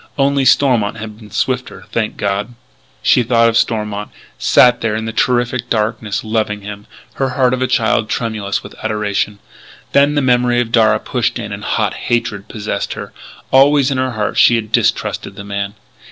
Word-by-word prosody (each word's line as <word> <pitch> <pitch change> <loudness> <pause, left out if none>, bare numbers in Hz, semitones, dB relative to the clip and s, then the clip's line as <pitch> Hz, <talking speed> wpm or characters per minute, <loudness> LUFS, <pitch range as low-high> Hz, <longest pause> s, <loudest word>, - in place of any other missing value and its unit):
Only 140 -1 +2
Stormont 120 -7 +3
had 110 -1 -7
been 105 -2 -13
swifter 105 -1 -2
thank 110 -2 -2
God! 100 +4 -2 0.5
She 130 - +4
thought 115 0 +3
of 115 - -2
Stormont 105 -3 -1 0.3
sat 125 -1 +4
there 110 -2 0
in 110 0 -3
the 110 - -4
terrific 120 0 0
darkness 110 -1 -1
loving 110 -2 -1
him, 105 0 -9 0.3
her 135 - +2
heart 130 -1 +2
of 130 - -2
a 130 - +2
child 115 -3 +1
tremulous 110 -4 -2
with - - -10
adoration. 105 -1 -1 0.5
Then 145 +1 +4
the 145 - +2
memory 125 -1 +2
of 120 -2 -1
Darragh 115 -2 +3
pushed - - -1
in - - -6
and - - -6
hot - - 0
hatred 105 -4 -2
possessed 105 -2 -4
her. - - -8 0.4
Always, 140 +1 +5
in 130 - -1
her 130 -1 -1
heart, 105 -2 -1
she 120 - +6
had 110 -2 -3
distrusted - - 0
the 100 - -8
man. 100 0 -4
115 Hz, 180 wpm, -17 LUFS, 105-125 Hz, 0.5 s, she